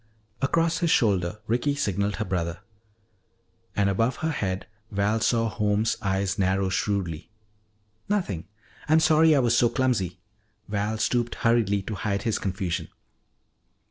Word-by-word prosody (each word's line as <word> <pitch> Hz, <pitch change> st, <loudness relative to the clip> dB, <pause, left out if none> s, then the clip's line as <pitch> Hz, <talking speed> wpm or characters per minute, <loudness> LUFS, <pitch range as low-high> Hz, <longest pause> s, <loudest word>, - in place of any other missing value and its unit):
Across 165 Hz, +4 st, +1 dB
his 170 Hz, -, +1 dB
shoulder 95 Hz, -, +2 dB
Ricky 125 Hz, +6 st, 0 dB
signaled 100 Hz, -6 st, -1 dB
her 110 Hz, -, -3 dB
brother. 85 Hz, -1 st, -2 dB, 1.1 s
And 100 Hz, -1 st, +2 dB
above 115 Hz, +6 st, +1 dB
her 160 Hz, -, -2 dB
head 95 Hz, -9 st, -2 dB, 0.2 s
Val 100 Hz, +2 st, +1 dB
saw 115 Hz, 0 st, +2 dB
Holmes' 105 Hz, 0 st, +1 dB
eyes 95 Hz, 0 st, -1 dB
narrow 95 Hz, 0 st, +1 dB
shrewdly. 95 Hz, -4 st, -2 dB, 0.8 s
"Nothing. 105 Hz, -, -1 dB, 0.4 s
I'm 155 Hz, +1 st, +6 dB
sorry 160 Hz, 0 st, +5 dB
I -, -, +4 dB
was 120 Hz, -2 st, +3 dB
so 120 Hz, 0 st, +4 dB
clumsy." 110 Hz, -, 0 dB, 0.5 s
Val 105 Hz, +1 st, -1 dB
stooped 120 Hz, +1 st, 0 dB
hurriedly 110 Hz, -4 st, +2 dB
to 110 Hz, -, -5 dB
hide 100 Hz, -1 st, -2 dB
his 115 Hz, -2 st, 0 dB
confusion. 95 Hz, -2 st, -2 dB
105 Hz, 135 wpm, -26 LUFS, 95-120 Hz, 1.1 s, I'm